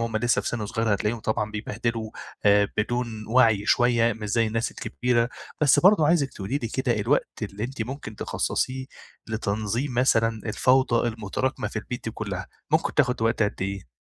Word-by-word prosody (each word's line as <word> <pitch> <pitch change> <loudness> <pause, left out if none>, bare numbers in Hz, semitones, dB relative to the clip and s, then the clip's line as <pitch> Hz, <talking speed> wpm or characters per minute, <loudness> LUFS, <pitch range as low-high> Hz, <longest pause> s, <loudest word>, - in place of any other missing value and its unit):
وهُم 115 -1 -1
لسّه 120 +2 +2
في - - -2
سِن 110 -3 -3
صغير 110 0 0
هتلاقيهم 105 +3 -1
طبعًا 105 0 -1
بيبهدلوا 110 +1 -3 0.3
آآ 100 -1 +5
بدون 115 0 -2
وَعْي 110 -4 +4
شوية 120 -1 +3
مش 105 -1 -6
زي 115 +1 +2
الناس 115 +2 -1
الكبيرة، 120 -1 0 0.3
بس 150 -3 +5
برضه 185 -4 +6
عايزِك 150 -5 +2
تقولي 105 +8 -3
لي 115 - -4
كده 125 -2 0
الوقت 120 +2 0
اللي 105 +1 -4
أنتِ 125 -1 -4
ممكن 120 -3 -7
تخصَّصيه 130 +4 -2 0.4
لتنظيم 110 +4 -2
مثلًا 115 -3 +2
الفوضى 125 +1 +3
المتراكمة 115 +4 -2
في 110 - -4
البيت 125 +3 -6
دي 115 - -2
كُلّها، 100 -3 -4 0.2
ممكن 160 +1 +1
تاخُد 125 -5 +2
وقت 115 0 +2
قد 105 -2 -1
إيه؟ 95 -5 -4
115 Hz, 170 wpm, -25 LUFS, 105-125 Hz, 0.4 s, برضه